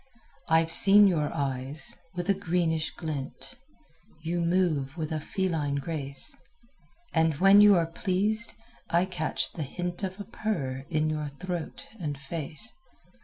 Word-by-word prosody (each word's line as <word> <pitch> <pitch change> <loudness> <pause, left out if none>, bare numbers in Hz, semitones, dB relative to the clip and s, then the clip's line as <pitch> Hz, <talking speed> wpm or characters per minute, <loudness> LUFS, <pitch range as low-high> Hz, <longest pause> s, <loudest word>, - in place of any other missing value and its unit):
I've 165 0 +3
seen 205 +3 +7
your 160 -6 +2
eyes, 140 0 -2 0.2
with 175 +1 -3
a 200 - +4
greenish 165 -4 0
glint; 150 -4 -6 0.7
You 170 +2 -1
move 170 -5 +1
with 155 -2 -3
a 155 - -1
feline 160 -4 -1
grace; 140 -2 -4 0.8
And 160 -2 +3
when 195 +6 +7
you 205 -1 +8
are 170 -2 +3
pleased 200 +7 -1 0.3
I 170 +2 +3
catch 180 -4 0
the 165 - -6
hint 175 +5 -4
Of 190 0 -4
a - - -4
purr 150 - -3
in 155 -2 +1
your 150 -1 -2
throat 175 +4 -6
and 150 -5 -3
face. 160 - -6
165 Hz, 140 wpm, -28 LUFS, 150-185 Hz, 0.8 s, you